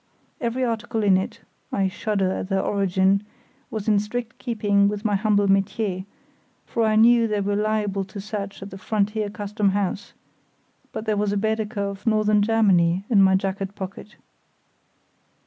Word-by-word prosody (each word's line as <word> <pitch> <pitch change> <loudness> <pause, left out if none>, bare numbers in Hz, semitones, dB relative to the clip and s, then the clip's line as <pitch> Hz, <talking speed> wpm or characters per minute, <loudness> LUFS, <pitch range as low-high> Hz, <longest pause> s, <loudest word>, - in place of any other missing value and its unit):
Every 245 +1 -1
article 225 -1 -2
in 195 -2 +5
it—I 190 +1 -3
shudder 195 -1 -1
at 190 - -4
their 195 -1 +1
origin—was 200 +2 -1
in 210 -2 +4
strict 230 +3 -5
keeping 205 -4 +2
with 205 +1 -3
my 205 -2 +2
humble 205 0 +2
métier, 195 -1 0 0.6
for 230 - -1
I 215 0 +2
knew 230 +1 +5
they 210 -1 -1
were 200 +1 0
liable 210 -2 0
to 200 +2 -9
search 200 -1 -5
at 195 - -9
the 190 - -9
frontier 210 +1 -1
Custom 205 -1 -1
house; 200 0 -3 0.8
but 220 - -5
there 215 -2 0
was 205 0 0
a 205 - 0
Baedeker 220 0 -1
of 200 +2 -5
Northern 215 -1 +3
Germany 195 -5 +3
in 205 -4 +6
my 190 0 +5
jacket 195 +1 -2
pocket. 195 +2 -8
205 Hz, 155 wpm, -23 LUFS, 195-215 Hz, 0.8 s, in